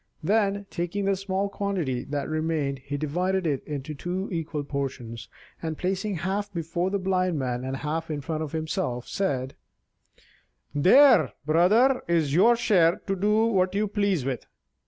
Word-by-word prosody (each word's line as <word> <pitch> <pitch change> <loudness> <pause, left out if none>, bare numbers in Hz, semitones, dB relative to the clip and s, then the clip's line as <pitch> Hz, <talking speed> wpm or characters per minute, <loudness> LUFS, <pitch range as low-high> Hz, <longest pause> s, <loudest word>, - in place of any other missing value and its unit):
Then, 200 +2 +1
taking 175 +4 -2
the 195 0 +2
small 195 +1 -1
quantity 185 -11 -2
that 145 -1 -3
remained, 155 -3 -1
he 145 +2 -5
divided 180 +6 -1
it 145 -4 -1
into 145 0 -5
two 180 +6 -4
equal 160 -3 -3
portions, 130 -5 -5 0.3
and 160 -2 -3
placing 195 +2 -1
half 195 +5 -2
before 170 +1 -2
the 200 - 0
Blind 185 -3 0
Man 125 -2 -2
and 130 +1 -3
half 160 +3 -3
in 150 -2 -2
front 155 +2 -3
of 155 -3 -4
himself, 155 -6 -2
said: 135 -9 -2 1.2
"There, 185 - +6
brother, 210 - +4
is 165 -5 +1
your 225 +9 +6
share 180 -7 +3
to 195 - -1
do 210 +3 +2
what 190 -4 +1
you 210 +1 +1
please 200 - 0
with." 135 -3 -3
170 Hz, 155 wpm, -26 LUFS, 145-195 Hz, 1.2 s, There